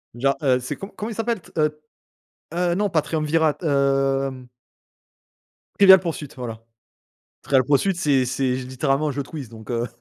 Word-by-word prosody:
Genre, 135 +3 +1
heu, 130 -3 +3
c'est 125 - -5
co 195 - -8
comment 210 +2 -6
il - - -6
s'appelle, 225 -3 -2
t - - -18
heu 150 0 +1 0.8
heu, 175 0 +1
non, 205 +3 +1
pas 160 -5 +1
triumvirat, 155 0 +1
hem. 135 -3 +1 1.3
Trivial 190 -1 +9
Pursuit, 165 -5 -5
voilà. 115 -3 -6 0.8
Trivial 135 -2 +2
Pursuit 150 +8 +2
c'est 140 -6 +2
c'est 130 +1 0
littéralement 135 +3 -1
un - - -1
jeu 140 - -3
de 135 - -16
quizz 145 -7 -7
donc 110 0 -11
heu 120 0 -1
140 Hz, 170 wpm, -22 LUFS, 130-165 Hz, 1.3 s, Trivial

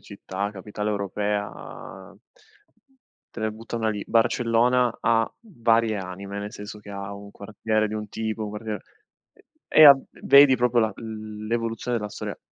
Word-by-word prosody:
città, 100 0 -5
capitale 105 +1 -5
europea 100 -1 -4 1.2
te 115 - -7
ne 110 - 0
butto 115 +2 -7
una 110 -1 0
lì: 105 -1 -4
Barcellona 120 +1 +2
ha 115 0 +2
varie 115 - +1
anime, 95 +2 -6
nel 105 +1 -6
senso 105 +1 -8
che 105 - -12
ha 100 0 -6
un 100 0 -11
quartiere 110 +1 -1
di 110 - -5
un 105 -1 -5
tipo, 110 +1 -3
un 105 - -5
quartiere 105 0 -5 0.5
e - - -25 0.2
e 155 - +8
ha 140 -2 +10 0.2
vedi 140 -1 +8
proprio 125 0 +2
la 110 -1 +1
l 110 -1 -7
l'evoluzione 115 +1 -2
della 105 -2 -3
storia. - - -6
110 Hz, 160 wpm, -25 LUFS, 100-115 Hz, 1.2 s, ha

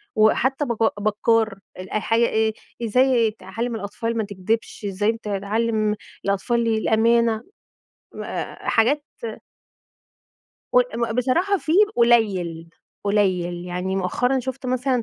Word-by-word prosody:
وحتّى 265 +6 +3
بك 225 -3 0
بكّار 215 -1 +1 0.2
الأ 185 +3 -3
حاجة 230 +2 +2
إيه، 220 0 +1 0.3
إزاي 235 -1 +3
تعلم 225 +4 -5
الأطفال 225 +2 -3
ما 220 - +1
تكدبش، 205 +2 -3
إزاي 205 +3 +1
ت 225 0 -10
تعلم 215 +2 0 0.3
الأطفال 230 +4 +1
الأمانة. 225 +1 +2 0.8
آآ، - - -5
حاجات 280 +6 +3 1.7
قل - - +6
ب 235 -1 -1
بصراحة 340 - +2
في 315 - -2 0.2
قليل، 195 -9 +2 0.4
قليل. 180 -4 +1
يعني 180 +2 -3
مؤخرًا 245 +8 +1
شُفت 260 +1 -5
مثلًا 255 0 0
225 Hz, 110 wpm, -23 LUFS, 200-235 Hz, 1.7 s, قل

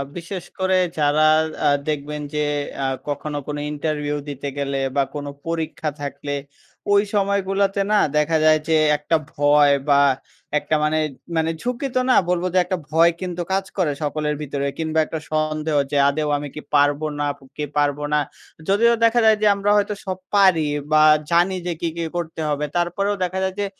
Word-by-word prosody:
বিশেষ 175 +2 -6 0.2
করে 190 0 +2 0.2
যারা 150 +1 +3 0.4
আ - - +5 0.2
দেখবেন 150 0 -3
যে 150 0 0 0.4
আ - - +1 0.2
কখনো 145 +1 -3
কোনো 145 0 -3
ইন্টারভিউ 150 -1 -2
দিতে 140 0 -5
গেলে 140 -1 -2 0.2
বা 140 - +3
কোনো 145 -1 -4 0.2
পরীক্ষা 160 -1 -2
থাকলে, 145 0 -4 0.6
ওই 200 0 +5
সময়গুলোতে 200 0 +1
না 210 - +4 0.2
দেখা 155 +2 +2
যায় 155 0 +5
যে 160 - +3 0.2
একটা 150 +3 0 0.2
ভয় 145 -1 +4 0.2
বা 140 0 +5 0.6
একটা 155 - -1
মানে 155 +1 +1 0.4
মানে 160 0 +1
ঝুঁকি 250 +3 -2
তো - - +4
না। - - +6 0.2
বলবো 180 0 +1
যে - - +2
একটা 185 +1 -2
ভয় 165 +2 +5
কিন্তু 180 -1 -4
কাজ 195 0 0
করে 175 -6 +1
সকলের 150 0 -1
ভিতরে 140 -1 -3
কিংবা 160 0 0
একটা 160 - -5
সন্দেহ 155 0 -1 0.2
যে, 145 - +1
"আদৌ 150 +1 -1
আমি 145 0 -5
কি 150 - -6
পারবো 145 +1 +3
নাকি 145 0 -4
পারবো 145 0 +1
না।" 150 - +4 0.5
যদিও 230 +4 +4
দেখা 230 +1 +3
যায় 220 -1 +5
যে 215 - +4
আমরা 200 +1 -1
হয়তো 205 0 +1
সব 185 -1 -3 0.2
পারি 190 -6 +5 0.3
বা 155 0 +5 0.3
জানি 175 +3 +3
যে 175 - 0
কী, 170 - 0
কী 170 - -2
করতে 165 -2 -4
হবে। 150 0 -1
তারপরেও 185 +4 0
দেখা 185 +1 -2
যায় 190 0 -2
যে 205 - 0
155 Hz, 175 wpm, -21 LUFS, 145-185 Hz, 0.6 s, না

